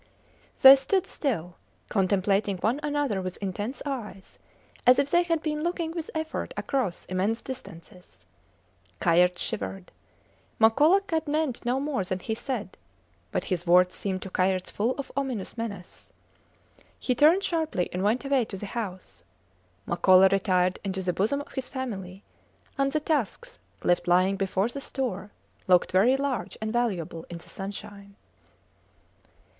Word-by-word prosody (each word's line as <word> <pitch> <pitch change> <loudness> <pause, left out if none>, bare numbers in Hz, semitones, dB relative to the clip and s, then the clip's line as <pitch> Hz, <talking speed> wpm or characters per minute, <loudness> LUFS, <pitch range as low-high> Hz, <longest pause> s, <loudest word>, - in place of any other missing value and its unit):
They 265 +1 +12
stood 360 +8 0
still, 180 - -3 0.3
contemplating 195 +1 +1
one 225 +9 0
another 290 -9 -1
with 185 -1 -5
intense 205 +6 -4
eyes, 225 -9 -6 0.5
as 250 - +8
if 280 0 +1
they 345 - +5
had 330 -3 -1
been 300 -1 -2
looking 340 -1 -2
with 330 -1 -5
effort 315 0 -4
across 250 -11 -2
immense 195 +5 -1
distances. 180 - -11 0.7
Kayerts 180 +1 +3
shivered. 195 -4 -4 0.7
Makola 295 - +5
had 320 -1 0
meant 295 -4 -1
no 250 +2 +1
more 280 -8 -1
than 185 0 -2
he 220 +4 -4
said, 235 -1 -5 0.5
but - - -2
his 175 0 -4
words 180 +1 +5
seemed 190 -2 -3
to 190 - -8
Kayerts 185 0 0
full 230 +5 0
of 280 - -6
ominous 260 -8 -3
menace! 205 -6 -7 0.9
He 255 - 0
turned 315 +9 +5
sharply 320 - 0
and 180 - -2
went 220 +7 +1
away 275 -3 +2
to 195 - -7
the 205 - -6
house. 185 - -6 0.6
Makola 185 +2 +5
retired 185 -2 +2
into 190 -1 -3
the 180 -1 0
bosom 225 +11 0
of - - -12
his 265 -2 -4
family; 195 -8 -6 0.5
and 275 -1 +1
the 305 - +1
tusks, 310 - -2 0.2
left 175 0 +2
lying 185 +2 +4
before 195 +1 0
the 275 +4 -6
store, 225 -9 -4 0.4
looked 180 -1 +4
very 220 +9 +4
large 265 -10 -3
and 220 0 -3
valuable 185 -9 -1
in 175 - -6
the 170 - -15
sunshine. 200 0 -8
210 Hz, 150 wpm, -27 LUFS, 185-275 Hz, 0.9 s, They